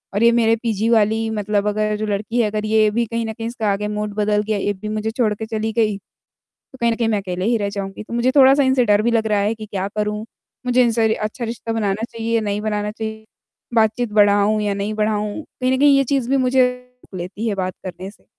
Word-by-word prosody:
और 215 - +2
ये 235 - +6
मेरे 230 -1 +3
पीजी 225 0 0
वाली 220 0 +2
मतलब 210 -1 -1
अगर 215 0 0
जो 215 - -2
लड़की 215 +3 -1
है, 215 - +2
अगर 215 0 -2
ये 215 0 +3
भी 235 +2 0
कहीं 230 +1 -3
न 220 - -4
कहीं 225 0 -5
इसका 225 -4 -1
आगे 210 +1 -2
मूड 210 0 -3
बदल 210 0 +1
गया, 215 -1 -1
ये 205 +1 -1
भी 210 +2 -7
मुझे 215 +1 -2
छोड़ 220 -3 +1
के 220 - -5
चली 220 0 -2
गई, 215 -3 +1 0.6
तो 260 - -19
कहीं 235 0 +2
न - - 0
कहीं 230 -1 0
मैं 215 - +1
अकेले 185 0 -4
ही 230 0 +2
रह 200 -1 -2
जाऊँगी। 200 0 -6
तो 230 - -10
मुझे 240 +2 +2
थोड़ा-सा 275 +1 +6
इनसे 260 -2 +3
डर 205 0 +4
भी 235 - +2
लग 220 -1 +1
रहा 210 -1 +2
है 205 +3 +1
कि 215 -1 -8
क्या 195 -2 -3
करूँ, 210 +1 -2 0.4
मुझे 250 0 +4
इनसे 225 -2 +2
अच्छा 215 +3 -4
रिश्ता 230 0 -4
बनाना 210 -1 -1
चाहिए 230 0 -2
या 225 - +2
नहीं 205 -1 -2
बनाना 210 -1 -2
चाहिए 220 0 -6 0.5
बातचीत 225 +1 +2
बढ़ाऊँ 205 0 +4
या 205 -1 0
नहीं 200 +2 -3
बढ़ाऊँ? 210 +5 -1 0.2
कहीं 255 0 +2
न 260 - 0
कहीं 285 -1 +6
ये 275 - +3
चीज़ 265 -2 -1
भी 275 - +3
मुझे 255 0 +3 0.5
लेती 190 +6 -4
है 205 - 0
बात 185 -1 -2
करने 185 +1 -6
से - - -26
215 Hz, 250 wpm, -20 LUFS, 210-230 Hz, 0.6 s, ये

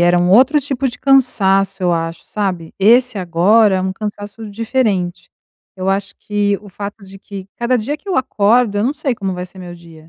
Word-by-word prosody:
era 175 0 +4
um 175 +1 +2
outro 265 +8 +5
tipo 270 -1 -2
de 245 - -7
cansaço, 195 -8 +2
eu 175 -1 +2
acho, 165 0 -3
sabe, 185 -6 -3
esse 240 +3 +4
agora 190 +4 +3
é - - 0
um 190 0 -2
cansaço 210 +1 -7
diferente. 210 -5 -1 0.5
Eu 185 0 -3
acho 195 0 -2
que 205 -1 0
o 205 - -12
fato 200 +2 -8
de 195 0 -12
que 195 -1 -9
cada 240 +2 +1
dia 265 +6 -3
que 395 - -16
eu 375 - 0
acordo, 230 -3 +2
eu 205 - +1
não 275 +5 0
sei 265 -5 -2
como 195 -3 -3
vai 180 0 -5
ser 185 +1 -16
meu 175 -1 -8
dia, 165 -2 -16
200 Hz, 210 wpm, -17 LUFS, 185-235 Hz, 0.5 s, outro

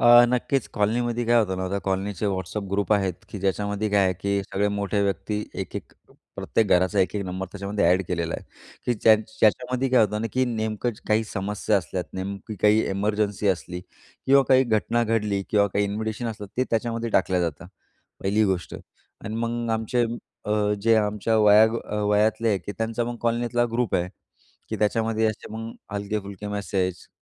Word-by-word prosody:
अ, 120 0 +8
नक्कीच 125 +1 0
कॉलनीमध्ये 120 +3 0
काय 120 +1 +5
होतं 95 -5 +1
ना, 95 0 -2
त्या 100 - -1
कॉलनीचे 95 +1 -1
WhatsApp 95 +1 -3
ग्रुप 100 +2 +1
आहेत, 95 -3 +1
की 105 - -7
ज्याच्यामध्ये 100 +2 -1
काय 100 -1 +4
आहे 95 - +2
की 100 0 0
सगळे 100 +2 -1
मोठे 100 0 0
व्यक्ती 100 +2 -1 0.2
1-1 - - -8 0.4
प्रत्येक 110 - +1
घराचा 95 +3 +3
1-1 100 +2 0
नंबर 95 +1 -4
त्याच्यामध्ये 100 -2 -1
एड 95 - +2
केलेला 85 -2 -2
आहे, - - -6 0.4
की 120 - +2
ज्या 110 +1 +6
ज्याच्यामध्ये 125 +4 0
काय 125 -1 +5
होतं 105 +1 -2
ना, 115 - -1
की 130 0 +2
नेमकंच 110 -1 -2
काही 110 +1 +3
समस्या 105 +1 -1
असल्यात. 90 -1 -3
नेमकी 100 +3 -5
काही 105 +1 +5
एमर्जन्सी 105 0 0
असली 90 -1 -2 0.5
किंवा 135 +1 +6
काही 130 0 +6
घटना 115 0 +1
घडली 105 -3 0
किंवा 100 -1 +4
काही 100 +1 0
इन्व्हिटेशन 110 +3 -3
असलं. 105 -3 -5
ते 130 - +2
त्याच्यामध्ये 115 0 -1
टाकल्या 95 -2 +2
जातं. 85 0 -3 0.5
पहिली 105 +3 +2
गोष्ट 95 -3 -1
आणि 110 - -11
मग 115 0 -2
आमचे 115 +2 +1 0.4
अ, 105 - -4 0.3
जे 115 +1 +4
आमच्या 105 +1 +1
वया 105 +1 +7 0.4
वयातले 105 +1 +2
की 100 +4 -7
त्यांचा 115 +1 -1
मग 120 0 -4
कॉलनीतला 120 +1 +1
ग्रुप 120 -2 0
आहे. 90 0 +1 0.6
की - - -3
त्याच्यामध्ये 110 +1 +1
असे 110 -1 -4
मग 115 +1 -5 0.2
हलके-फुलके 100 0 -4
मॅसेज. 95 -3 -2
105 Hz, 170 wpm, -25 LUFS, 100-115 Hz, 0.6 s, अ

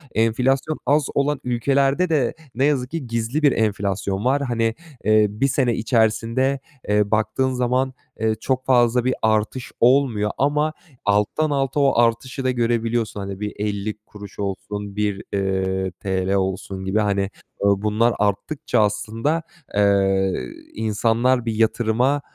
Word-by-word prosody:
Enflasyon 130 +7 +1
az 145 0 +3
olan 140 0 +1
ülkelerde 135 +7 +1
de 140 -7 +1 0.2
ne 130 +3 +2
yazık 130 -4 0
ki 155 -6 -4
gizli 115 +5 -1
bir 145 -2 +5
enflasyon 100 -2 -1
var. 135 +3 +2
Hani, 115 -4 0 0.3
eee, 110 0 +4
bir 105 +7 0
sene 125 -3 +1
içerisinde, 115 +4 +1 0.3
eee, 105 0 +2
baktığın 120 +5 +1
zaman, 125 +1 0 0.3
eee, 110 0 +1
çok 130 +4 -2
fazla 120 -1 +3
bir 130 - +2
artış 110 +3 0
olmuyor 120 -5 +3
ama 150 +2 +1 0.3
alttan 105 +10 +1
alta 135 0 0
o 135 -4 +3
artışı 120 +3 0
da 130 - +2
görebiliyorsun. 115 -2 0
Hani 100 -1 -6
bir 105 0 -4
50 105 0 -2
kuruş 105 -1 -12
olsun, 100 +1 -4
bir, 105 -2 -1
eee, 95 -1 -1
TL 95 0 -1
olsun 95 0 -2
gibi. 100 +3 +1 0.6
Bunlar 105 +4 +2
arttıkça 105 +6 0
aslında, 110 +9 0 0.3
eee, 95 -2 +3 0.4
insanlar 115 +3 +1
bir 115 - -1
yatırıma, 120 +5 +1
115 Hz, 135 wpm, -22 LUFS, 105-130 Hz, 0.6 s, bir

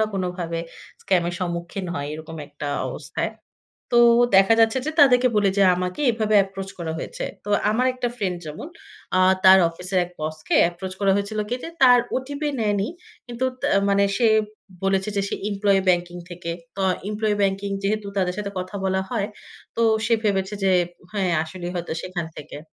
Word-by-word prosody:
না - - +4
কোনোভাবে 180 -3 -3 0.4
স্ক্যাম 185 -2 +2
এর 175 - -4
সম্মুখীন 175 +2 -4
হয় 145 0 -3
এরকম 160 +1 -8
একটা 145 0 -6 0.2
অবস্থায়। - - -4 0.6
তো 240 - +5 0.4
দেখা 195 +3 +6
যাচ্ছে 225 +3 +4
যে 310 - 0
তাদেরকে 255 -3 +6
বলে 205 -1 +3
যে 200 - +5
আমাকে 180 +6 -3
এভাবে 215 -2 0
এপ্রোচ 195 0 -7
করা 160 -2 -3
হয়েছে। - - -5 0.2
তো 205 - -8 0.2
আমার 245 +4 +1
একটা 250 -1 -2
ফ্রেন্ড 190 -6 -2
যেমন 155 - -7 0.5
আ - - +4 0.2
তার 190 0 +9
অফিসের 180 +3 -3
এক 175 - -12
বসকে 155 0 -3 0.2
এপ্রোচ 185 +2 -7
করা 195 -1 +3
হয়েছিল 200 +2 -3
কি 245 - -1
যে - - -5
তার 250 -1 +8 0.2
ওটিপি 285 +3 -3
নেয়নি। 205 -2 0 0.4
কিন্তু 240 +1 -3 0.2
তা - - 0 0.2
মানে 200 0 +3
সে 235 - +3 0.6
বলেছে 195 +1 +1
যে 200 - +2
সে - - -2 0.2
এমপ্লয়ি 200 -1 +2
ব্যাংকিং 175 -1 +1
থেকে। 175 -1 -5 0.2
তো - - -4 0.3
এমপ্লয়ি 215 0 0
ব্যাংকিং 195 0 0
যেহেতু 210 +1 -1
তাদের 180 -2 0
সাথে 205 -1 -3
কথা 185 +2 -6
বলা 190 0 +1
হয় 220 -5 -1 0.5
তো 230 - +1 0.2
সে 230 - +3
ভেবেছে 195 -1 0
যে 190 - +4 0.4
হ্যাঁ, 195 -3 0
আসলেই 175 +2 -6
হয়তো 175 -2 -4
সেখান 180 -3 -4
থেকে। 150 0 -9
195 Hz, 175 wpm, -23 LUFS, 175-215 Hz, 0.6 s, তার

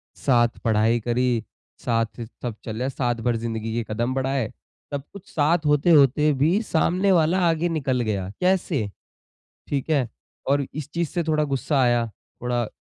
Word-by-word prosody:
साथ 120 -3 +2
पढ़ाई 110 +1 +3
करी 120 0 0 0.4
साथ 115 0 -1 0.2
सब 120 -4 -3
चले, 120 +4 -2
साथ 120 -3 -1
भर 120 -1 +2
ज़िंदगी 115 -1 -3
के 115 0 -1
कदम 120 +4 -1
बढ़ाए। 135 -3 0 0.5
सब 140 -1 -2
कुछ 200 -1 -11
साथ 160 +1 +1
होते-होते 150 -1 +5
भी 175 +9 +3
सामने 185 +1 +2
वाला 170 +1 +3
आगे 165 +2 +1
निकल 135 -6 0
गया। 100 -5 -2
कैसे? 180 - +1 0.8
ठीक 140 +1 -2
है? 140 -6 +2 0.4
और 140 0 +2
इस 150 -1 -6
चीज़ 170 -2 -1
से 175 -2 -1
थोड़ा 155 -1 +1
गुस्सा 140 0 0
आया 120 -1 +3 0.4
थोड़ा 120 -2 -1
135 Hz, 155 wpm, -24 LUFS, 120-155 Hz, 0.8 s, होते-होते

